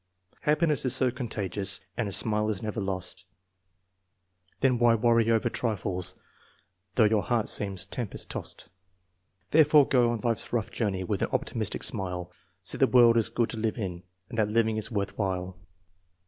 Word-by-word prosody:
Happiness 150 Hz, -1 st, +1 dB
is 130 Hz, -1 st, +2 dB
so 130 Hz, -2 st, +2 dB
contagious, 105 Hz, -6 st, -3 dB, 0.2 s
and 115 Hz, -4 st, -2 dB
a -, -, -6 dB
smile 105 Hz, +1 st, +1 dB
is 105 Hz, -2 st, -3 dB
never 110 Hz, 0 st, -3 dB
lost; 95 Hz, -1 st, -4 dB, 1.4 s
Then 130 Hz, -3 st, +3 dB
why 120 Hz, -1 st, +5 dB
worry 115 Hz, 0 st, +3 dB
over 115 Hz, -1 st, +2 dB
trifles, 95 Hz, -6 st, -2 dB, 0.8 s
though 115 Hz, -, +5 dB
your 105 Hz, -1 st, +3 dB
heart 115 Hz, -1 st, 0 dB
seems 95 Hz, -2 st, -1 dB
tem 115 Hz, +4 st, -4 dB
pest -, -, -5 dB
tossed. -, -, -7 dB, 0.8 s
Therefore 150 Hz, -2 st, +6 dB
go 125 Hz, -3 st, +3 dB
on 115 Hz, -2 st, -2 dB
life's 115 Hz, -1 st, -2 dB
rough 115 Hz, -3 st, -1 dB
journey 100 Hz, -5 st, -1 dB
with 90 Hz, -, -2 dB
an -, -, 0 dB
optimistic -, -, -2 dB
smile, 90 Hz, -2 st, -1 dB, 0.3 s
See -, -, 0 dB
the -, -, +5 dB
world 120 Hz, -2 st, +6 dB
is 115 Hz, -2 st, +3 dB
good 120 Hz, -2 st, 0 dB
to 115 Hz, -, -5 dB
live 110 Hz, +1 st, -1 dB
in, 90 Hz, -6 st, -4 dB, 0.3 s
and 115 Hz, -2 st, -5 dB
that 105 Hz, -, +3 dB
living 110 Hz, 0 st, +1 dB
is 110 Hz, -, -2 dB
worth 100 Hz, -3 st, -3 dB
while. 90 Hz, -2 st, -2 dB
110 Hz, 170 wpm, -28 LUFS, 100-120 Hz, 1.4 s, Therefore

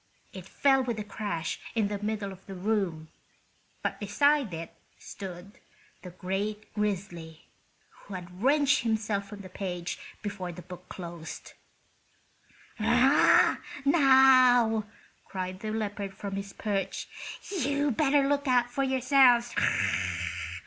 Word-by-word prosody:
It 185 Hz, -1 st, -9 dB
fell 270 Hz, +3 st, +3 dB
with 240 Hz, -3 st, -2 dB
a 210 Hz, -, -3 dB
crash 200 Hz, -6 st, -4 dB, 0.2 s
in 220 Hz, -3 st, +2 dB
the 205 Hz, 0 st, -4 dB
middle 210 Hz, -2 st, -2 dB
of 190 Hz, 0 st, -13 dB
the 195 Hz, -, -7 dB
room, 180 Hz, -5 st, -1 dB, 0.7 s
but -, -, -2 dB
beside 270 Hz, +4 st, +2 dB
it 165 Hz, 0 st, -7 dB, 0.2 s
stood 190 Hz, 0 st, -9 dB, 0.4 s
the 180 Hz, -, -9 dB
great 195 Hz, +4 st, -4 dB
grizzly, 180 Hz, -6 st, -4 dB, 0.5 s
who 200 Hz, -, -11 dB
had 180 Hz, +1 st, -9 dB
wrenched 285 Hz, +2 st, +3 dB
himself 215 Hz, -3 st, -1 dB
from 205 Hz, -1 st, -9 dB
the 190 Hz, -, -9 dB
page 180 Hz, -2 st, -5 dB, 0.2 s
before 200 Hz, -4 st, -4 dB
the 175 Hz, +1 st, -10 dB
book 180 Hz, +1 st, -11 dB
closed. 170 Hz, -3 st, -8 dB, 1.3 s
"Now," 250 Hz, +6 st, +5 dB, 1.7 s
cried 185 Hz, -1 st, -5 dB
the 215 Hz, -, -5 dB
leopard 205 Hz, -2 st, -3 dB
from 195 Hz, 0 st, -5 dB
his 200 Hz, 0 st, -5 dB
perch, 200 Hz, -2 st, -3 dB, 0.6 s
"you'd 285 Hz, -1 st, 0 dB
better 280 Hz, 0 st, +3 dB
look 285 Hz, 0 st, 0 dB
out 245 Hz, -1 st, +3 dB
for 275 Hz, -, -1 dB
yourselves! 260 Hz, -2 st, +4 dB
205 Hz, 120 wpm, -28 LUFS, 185-240 Hz, 1.7 s, Now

